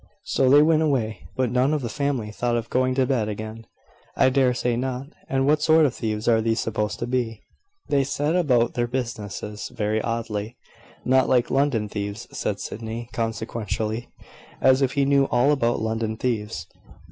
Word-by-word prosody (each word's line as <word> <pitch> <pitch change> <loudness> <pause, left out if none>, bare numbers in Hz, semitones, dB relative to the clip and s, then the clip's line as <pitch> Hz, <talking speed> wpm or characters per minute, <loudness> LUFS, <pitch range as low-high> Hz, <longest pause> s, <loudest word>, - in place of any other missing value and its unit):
So 130 - +2
they 145 +2 +7
went 160 0 +4
away; 125 -8 -1
but 130 -3 0
none 130 +4 +2
of 145 - -3
the - - -1
family 130 -4 -2
thought 120 +2 0
of 115 0 -5
going 130 0 +2
to 130 -1 +3
bed 120 -5 0
again." 110 +2 -6 0.5
"I 130 -1 +4
dare 130 -2 +3
say 125 -1 0
not. 130 +2 -3 0.2
And 135 0 +1
what 150 +1 +3
sort 160 0 +5
of 135 - +1
thieves 110 -1 -3
are 115 -2 +4
these 115 0 0
supposed 110 -1 -2
to - - -3
be? 120 -3 -2 0.4
They 140 -1 +2
set 145 +4 -1
about 125 -9 +2
their 120 0 0
business 110 -4 -4
very 105 +1 -1
oddly." 115 0 -3 0.5
"Not 130 +1 +3
like 125 -2 +2
London 135 -6 +1
thieves," 105 +2 -5
said - - -2
Sydney, 115 +1 -6
consequentially, 115 0 -3 0.5
as 130 +1 +4
if 135 -2 +1
he 140 -1 +2
knew 140 0 +4
all 125 +2 +3
about 120 -5 +1
London 110 0 -2
thieves. 105 -9 -2
120 Hz, 180 wpm, -24 LUFS, 110-135 Hz, 0.5 s, they